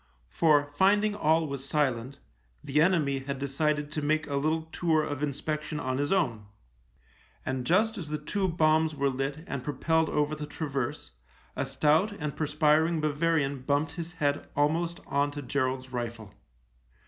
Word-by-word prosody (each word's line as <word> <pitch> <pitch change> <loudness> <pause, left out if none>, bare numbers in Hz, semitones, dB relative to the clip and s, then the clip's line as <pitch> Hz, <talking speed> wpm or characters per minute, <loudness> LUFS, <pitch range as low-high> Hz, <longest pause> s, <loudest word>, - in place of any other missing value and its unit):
For, 145 - +3
find 200 +6 +4
ing 210 - 0
all 160 -4 +2
was 140 -3 -5
silent, 135 -2 -1 0.5
the 150 +2 +2
enemy 155 -6 +2
had 135 +1 -4
decided 145 +2 -1
to 155 - -2
make 155 +1 +1
a 140 - -3
little 155 +3 +1
tour 160 -3 +2
of 145 -2 -4
inspection 150 +1 -2
on 130 0 -2
his 145 0 -1
own, 120 - 0 1.0
and 130 -1 -2
just 215 +5 +2
as 160 -4 -6
the 150 - -1
two 190 +6 -1
bombs 160 -2 +2
were 140 -1 +1
lit 135 +4 -3
and 140 -6 -4
pro 145 0 -4
pelled 160 +3 +2
over 150 0 0
the 150 -1 -5
traverse 140 - -4 0.4
a - - -2
stout 160 +8 +2
and 150 -7 -4
per 155 - -1
spiring 155 +2 +3
Bavarian 150 -2 0
bumped 145 +3 0
his 170 +1 -6
head 145 -4 -1
almost 165 +4 +1
on 140 +1 +1
to 145 0 -7
Gerald's 130 0 -1
rifle. 115 -4 -5
150 Hz, 170 wpm, -28 LUFS, 140-160 Hz, 1.0 s, find